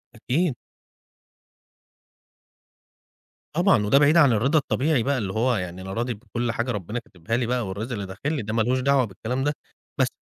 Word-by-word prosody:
أكيد. 140 +6 0 3.0
طبعًا، 175 - +3
وده 105 +7 +4
بعيد 150 +3 +5
عن 145 -6 +6
الرضا 135 +9 +3
الطبيعي 140 -2 +1
بقى 140 +2 +1
اللي 100 -6 -3
هو 120 +4 +2
يعني 90 -2 -4
أنا 95 +1 -6
راضي 120 +2 -1
بكل 120 +2 -3
حاجة 120 +2 -2
ربنا 105 +2 -3
كاتبها 115 +2 -4
لي 125 - 0
بقى 120 -2 -1
والرزق 105 +6 -5
اللي 100 -3 -3
داخل 100 +11 -4
لي 145 - -1
ده 110 0 -4
ما 115 - +2
لهوش 125 +4 +1
دعوة 135 0 +3
بالكلام 120 +5 -4
ده، 145 - +1 0.4
بس - - +3
120 Hz, 175 wpm, -24 LUFS, 105-135 Hz, 3.0 s, عن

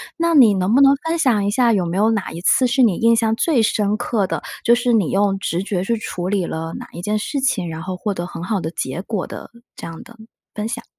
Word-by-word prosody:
那 335 0 0
你 240 -8 +7
能 190 +2 0
不 260 - +5
能 275 0 +6
分 330 +1 0
享 235 -9 +2
一 205 - 0
下 235 +1 +3
有 190 -4 +1
没 170 +2 -3
有 215 +3 +3
哪 210 -3 -2
一 165 - -7
次 255 +7 +3
是 260 +2 +1
你 205 -7 +3
印 230 0 +3
象 225 -1 +1
最 265 -1 +2
深 210 -1 +1
刻 215 -2 -1
的， - - -3 0.2
就 235 - +4
是 245 0 0
你 205 -7 +2
用 195 0 +1
直 180 -2 -2
觉 190 -2 -2
去 230 +3 -1
处 180 -4 -4
理 195 -3 0
了 165 0 -5
哪 - - -9
一 170 - -7
件 210 +3 -1
事 275 +6 -3
情， 200 -10 0
然 160 0 -6
后 185 -1 -5
获 205 +2 -2
得 175 -2 -4
很 170 -1 -8
好 195 -1 -2
的 160 - -4
结 130 +1 -4
果 200 -1 -4
的 - - -9 0.2
这 - - -9
样 165 -1 -8
的 235 - -15
分 225 -1 -16 0.4
享？ 230 - -5
210 Hz, 290 characters per minute, -20 LUFS, 185-235 Hz, 0.4 s, 你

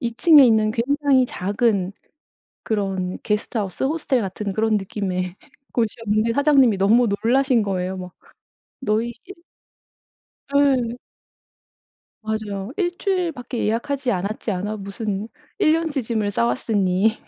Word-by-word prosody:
2 235 -1 -2
층에 295 +4 +7
있는 220 -3 +3
굉장히 270 +2 +2
작은 200 -2 0 0.7
그런 195 -4 -2
게스트하우스, 210 -1 -2
호스텔 280 -3 0
같은 200 0 -4
그런 220 +1 +1
느낌의 190 -2 -3 0.4
곳이었는데 225 -1 0
사장님이 275 -5 +4
너무 225 +5 +4 0.2
놀라신 255 -1 +3
거예요. 190 -1 -2
막 180 -1 -8 0.7
"너희 230 0 0
1" 390 - -9 1.2
예. 265 -5 +3 1.3
맞아요. 215 -1 -4
"1 355 -2 -1
주일 365 -4 0
밖에 245 -3 -5
예약하지 250 +4 -1
않았지 200 +4 -2
않아?" 205 +3 -3
무슨 200 +1 -4 0.3
1 310 - +4
년 325 -1 0
치 275 - -1
짐을 220 -3 -1
싸왔으니. 190 - +1
220 Hz, 255 characters per minute, -22 LUFS, 200-255 Hz, 1.3 s, 층에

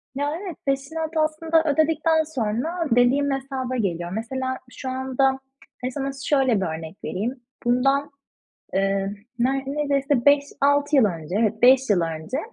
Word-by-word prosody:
Ya 290 +2 -1
evet, 360 -6 -6
peşinat 315 +4 -2
aslında 320 +1 +2
ödedikten 315 +1 +2
sonra 300 +5 -2
dediğim 255 +4 +3
hesaba 265 -1 -3
geliyor. 175 -6 -2
Mesela 260 +5 -3
şu 260 +1 -6
anda 265 +1 0 0.4
hadi 255 - -2
sana 275 +1 -3
şöyle 260 -8 +2
bir - - 0
örnek 160 +3 -9
vereyim. 240 +7 -3 0.3
Bundan, 275 +4 +2 0.6
eee, 195 +1 0 0.2
neredeyse 275 +1 0
5-6 285 0 +3
yıl 255 - +6
önce, 170 -1 -2
evet 220 0 0
5 260 -1 +6
yıl 190 - +4
önce, 165 +7 -3
265 Hz, 135 wpm, -23 LUFS, 230-285 Hz, 0.6 s, yıl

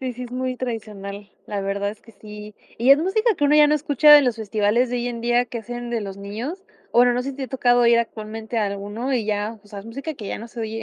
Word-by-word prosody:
Sí, 255 -1 -3
sí, 250 +1 -7
es 240 - -10
muy 255 0 -3
tradicional. 205 -4 -6 0.2
La 205 -2 -3
verdad 200 +1 -2
es 210 - -8
que 230 - -17
sí. 210 0 -11 0.2
Y 240 +4 +3
es 275 - +8
música 430 +7 +1
que 295 - -1
uno 290 +1 +4
ya 300 0 +7
no 300 - +3
escucha 295 0 +5
de 295 - +10
los 250 -4 0
festivales 220 +3 +1
de 245 - -1
hoy 245 0 -2
en 235 -1 -6
día 240 +1 +2
que 240 - -7
hacen 240 +2 -6
de 235 -2 -2
los 195 -1 -7
niños. 230 - -6 0.3
O - - +2
bueno, 245 0 +5
no 250 - 0
sé 275 - -4
si 270 - -10
te 275 - -4
ha - - -9
tocado 245 -2 +3
ir 235 0 +5
actualmente 220 0 -4
a 215 - +1
alguno, 205 +6 -3
y 235 -4 0
ya, 210 +1 -2
o - - -19
sea, 205 -1 -9
es 200 - -10
música 275 +7 -5
que 225 -7 -9
ya - - -4
no 230 - -9
se 230 - -8
oye. 225 0 -4
235 Hz, 295 wpm, -22 LUFS, 210-255 Hz, 0.3 s, de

